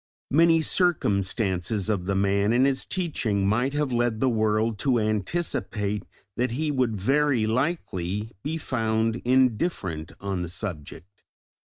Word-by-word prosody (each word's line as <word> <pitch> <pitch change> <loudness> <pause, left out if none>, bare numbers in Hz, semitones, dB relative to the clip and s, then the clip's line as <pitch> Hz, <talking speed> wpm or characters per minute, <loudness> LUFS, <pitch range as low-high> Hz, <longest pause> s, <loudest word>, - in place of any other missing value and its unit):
Many 165 +2 +4
circumstances 100 - +1
of 100 -5 -1
the 100 - 0
man 100 +2 +2
and 125 +2 +4
his 135 -1 +1
teaching 120 - -1
might 120 +7 +1
have 145 -3 -1
led 120 -2 0
the 130 - +2
world 110 -1 +1
to 130 +2 +2
anticipate 105 - -1 0.3
that 125 +1 +1
he 150 +4 -1
would 125 -6 0
very 135 +1 +2
likely 110 - -2
be 160 +6 -3
found 115 -5 -1
indifferent 115 - 0
on 95 -2 -3
the 85 - -4
subject. 90 0 -7
110 Hz, 130 wpm, -25 LUFS, 100-130 Hz, 0.3 s, Many